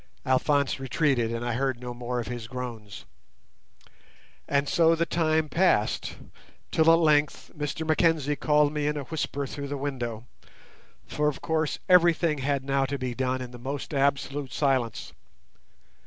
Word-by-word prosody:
Alphonse 140 +1 +1
retreated, 135 -3 +1
and 115 +1 -3
I 120 - -1
heard 130 0 -1
no 125 0 -6
more 120 0 -3
of 120 - -3
his 120 -2 -6
groans. 115 -5 -7 1.4
And 140 0 +1
so 165 +1 +4
the 165 +1 0
time 155 -1 +1
passed, 155 - +1 0.6
till 160 0 +5
at 165 - +6
length 150 -2 +2
Mr 150 +2 -3
Mackenzie 155 -2 +2
called 150 0 +2
me 150 -1 -1
in 150 0 -1
a 145 - -3
whisper 145 -1 -3
through 140 +1 -6
the 145 0 -4
window, 125 -5 -4 0.8
for 150 0 -1
of 150 - -1
course 160 -2 -1
everything 170 -4 +4
had 135 0 -1
now 135 0 +1
to 140 +1 -3
be 130 -2 -3
done 130 +1 -1
in 125 - -9
the 120 - -10
most 135 +4 -5
absolute 140 0 0
silence. 130 -6 -1
140 Hz, 155 wpm, -27 LUFS, 125-150 Hz, 1.4 s, at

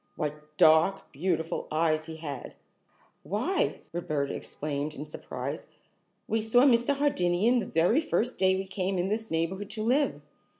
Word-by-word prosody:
What 150 -1 -5
dark, 160 +5 +4
beautiful 160 +2 -2
eyes 155 0 +1
he 160 - -6
had! 145 -5 -7 0.7
"Why," - - -1
Roberta 150 -5 -2
exclaimed 150 0 -4
in 145 - -6
surprise. 150 - -6 0.6
"We 225 0 +1
saw 225 +3 +4
Mr. 255 +1 +4
Hardinian 235 -4 +2
the - - -3
very 175 - +3
first 250 -6 -1
day 190 0 +4
we 190 +1 -3
came 190 0 -2
in 180 +2 0
this 220 +1 -2
neighborhood 180 +5 -2
to 215 +1 -4
live. 270 +6 +1
180 Hz, 145 wpm, -28 LUFS, 155-220 Hz, 0.7 s, dark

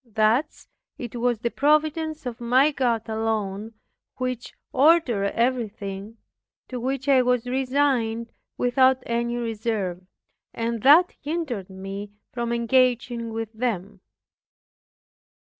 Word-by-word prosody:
Thus 230 +6 0 0.3
it 240 -2 -7
was 240 0 +1
the 235 - -1
Providence 310 +1 +1
of 240 -1 -5
my 255 +5 +4
God 240 -5 0
alone, 220 -1 -2 0.4
which 255 -1 -4 0.2
ordered 270 -7 +4
everything, 220 -4 -2 0.5
to 250 - -4
which 265 +2 -3
I 270 -2 +6
was 250 -1 +1
resigned 250 -3 0 0.3
without 260 +1 +3
any 235 0 -1
reserve; 220 -6 -2 0.5
and 230 -1 -2
that 315 - +6
hindered 285 - -3
me 195 +2 -7 0.2
from 235 -1 -2
engaging 240 -1 +1
with 225 0 -4
them. 210 -4 -3
235 Hz, 110 wpm, -24 LUFS, 220-260 Hz, 0.5 s, I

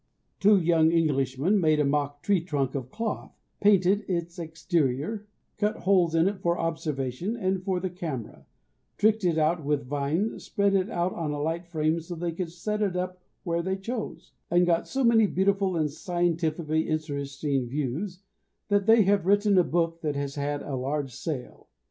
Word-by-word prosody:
Two 205 0 +6
young 165 -2 +3
Englishmen 150 +3 +2
made 155 -2 +3
a 150 - +3
mock 145 0 -1
tree 200 -4 +2
trunk 140 -6 -1
of 130 -3 -4
cloth, 225 - -4 0.2
painted 200 0 +4
its 175 -1 -3
exterior, 160 - -1 0.3
cut 210 +1 +1
holes 180 -4 +2
in 165 +2 +4
it 200 -1 -2
for 170 -1 +1
observation 160 - -2
and 190 -3 -1
for 185 -2 0
the 185 0 -3
camera, 160 - -6 0.5
tricked 215 0 +3
it 170 -3 +2
out 160 +1 +1
with 145 -1 0
vines, 145 - -1
spread 200 -2 +1
it 195 +1 +1
out 175 -2 -1
on 165 -3 -3
a 145 0 -3
light 165 +3 -2
frame 160 -1 0
so 170 +2 -7
they 170 +1 -2
could 165 0 -4
set 210 +5 -3
it 195 -4 0
up 180 0 -3 0.2
where 170 -1 0
they 190 +2 -2
chose, 220 +3 -6 0.2
and 175 +1 +4
got 170 -1 +1
so 270 0 -1
many 225 -3 +5
beautiful 195 0 +1
and 155 -3 0
scientifically 165 -1 -1
interesting 140 -3 -2
views 150 +9 -3 0.5
that 205 0 +2
they 225 -1 +7
have 195 -2 +2
written 205 0 +4
a - - +5
book 165 0 -1
that 150 -2 -2
has 140 -1 -3
had 145 0 -2
a 145 - -6
large 135 +1 -2
sale. 130 -2 -6
170 Hz, 180 wpm, -27 LUFS, 150-190 Hz, 0.5 s, they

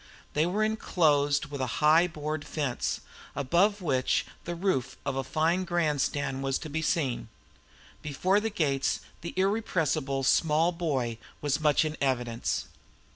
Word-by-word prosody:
They 155 +3 +2
were 205 +4 0
inclosed 150 -9 +2
with 140 -2 -4
a 130 - 0
high 155 +3 +5
board 155 -1 -4
fence, 145 -7 -2 0.3
above 180 +9 +2
which 130 -5 +1 0.2
the 175 - -3
roof 170 -8 -1
of - - -1
a 135 - -1
fine 165 +7 +1
grandstand 145 -5 0
was 135 -1 0
to 155 - -6
be 160 +2 -1
seen. 135 -8 -1 0.7
Before 180 +7 +1
the 225 +1 -1
gates 145 -9 0 0.2
the 170 - -6
irrepressible 165 -9 0
small 160 +4 +3
boy 135 -10 -2 0.2
was 145 0 0
much 150 +1 +4
in 155 0 -3
evidence. 120 -4 -1
150 Hz, 140 wpm, -28 LUFS, 135-175 Hz, 0.7 s, high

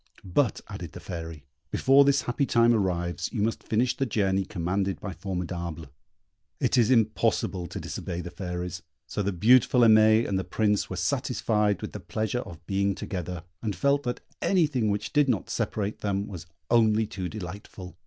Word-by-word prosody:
"But," 105 +6 +1
added - - -7
the - - -8
Fairy, 80 -3 -7 0.2
"before 135 +1 +5
this 140 -1 +3
happy 130 +3 -1
time 120 0 +4
arrives, 90 -4 -1
you 110 -4 -1
must 115 +1 -1
finish 120 +3 +1
the 135 - -1
journey 100 -3 +1
commanded 95 0 -2
by 95 - -5
Formidable." 85 -3 -5 0.7
It - - +1
is 115 -3 +4
impossible 110 -6 +1
to - - -6
disobey 90 -1 -5
the 90 - -7
Fairies; 90 -1 -5 0.2
so - - -3
the 100 0 0
beautiful 120 +6 +5
Aimée 110 0 +6
and 95 -1 0
the - - -2
Prince 105 0 0
were 95 - -4
satisfied 105 0 0
with - - -4
the - - -6
pleasure 110 +3 -2
of 85 -7 -11
being 100 +1 0
together, 90 -4 -5 0.2
and 105 -4 -2
felt 140 +9 +2
that 125 -2 -3 0.2
anything 145 - +2
which 105 +1 -2
did 145 -2 +4
not 110 -7 -1
separate 105 0 -2
them 100 -1 -1
was 90 -3 -8 0.2
only 110 -2 +4
too 95 -4 -5
delightful. 95 -2 -8
100 Hz, 175 wpm, -27 LUFS, 90-115 Hz, 0.7 s, Aimée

